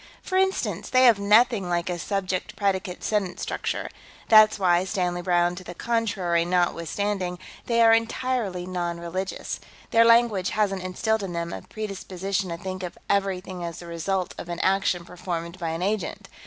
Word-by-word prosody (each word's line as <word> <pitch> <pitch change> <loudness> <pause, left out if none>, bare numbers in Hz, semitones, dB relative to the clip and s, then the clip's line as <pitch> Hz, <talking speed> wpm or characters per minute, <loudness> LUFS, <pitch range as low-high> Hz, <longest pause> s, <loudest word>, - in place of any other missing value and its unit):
For 370 - -4
instance, 380 0 0
they 255 0 +4
have 235 -5 +6
nothing 210 -1 +4
like 175 0 0
a 175 -1 -2
subject 185 +1 -2
predicate 190 -2 -1
sentence 205 -4 -1
structure. - - -3 0.4
That's 215 -1 +7
why, 180 -2 +3
Stanley 180 -2 -1
Browne 175 -1 +2
to 185 - -7
the 175 - -9
contrary 200 -8 0
notwithstanding, 180 +2 -1 0.3
they 235 -1 +4
are 225 0 +7
entirely 225 -5 0
non 175 -2 -3
religious. 185 +3 -4 0.3
Their 230 - +6
language 230 -5 +4
hasn't 195 -3 +1
instilled 210 +4 -1
in 190 -3 -4
them 170 0 -3
a - - -6
predisposition 195 -2 -4
to 170 - -4
think 185 +1 -5
of 180 -1 -6
everything 190 -2 -1
as 170 -2 -5
the 175 - -9
result 175 +2 -2
of 175 - -7
an 170 - -3
action 190 -2 +1
performed 175 0 -5
by 170 -2 -2
an 165 +2 -3
agent. 205 -2 -2
185 Hz, 170 wpm, -25 LUFS, 175-210 Hz, 0.4 s, That's